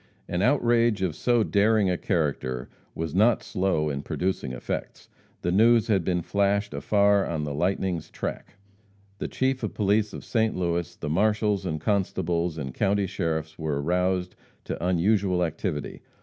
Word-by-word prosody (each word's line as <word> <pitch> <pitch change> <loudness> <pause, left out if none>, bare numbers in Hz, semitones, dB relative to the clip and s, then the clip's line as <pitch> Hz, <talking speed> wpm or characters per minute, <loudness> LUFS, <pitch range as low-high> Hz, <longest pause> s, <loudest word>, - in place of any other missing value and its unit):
An 90 - -1
outrage 120 -4 +3
of 85 -5 -1
so 120 -2 +2
daring 105 0 +3
a 90 - +1
character 75 - -2 0.3
was 80 -2 -3
not 110 +5 +3
slow 95 -6 0
in 70 0 -3
producing 90 -3 -2
effects. 65 - -5 0.3
The 85 - +1
news 115 +4 +4
had 95 -5 +3
been 90 0 0
flashed 100 +2 0
afar 100 -1 +3
on 80 -3 -2
the 75 -1 -3
lightning's 90 +1 -1
track. - - -6 0.6
The - - -2
Chief 130 0 -1
of - - -4
Police 105 +1 +2
of - - -8
St. 110 -2 +1
Louis, 85 -2 -1
the - - -6
marshals 105 +2 +1
and 80 -2 -2
constables, 85 -3 0
and 65 -4 -5
county 100 0 +1
sheriffs 80 -5 -3
were 75 -3 -1
aroused 90 +3 0 0.3
to - - -5
unusual 90 +1 +2
activity. 75 -2 -4
95 Hz, 155 wpm, -26 LUFS, 80-105 Hz, 0.6 s, news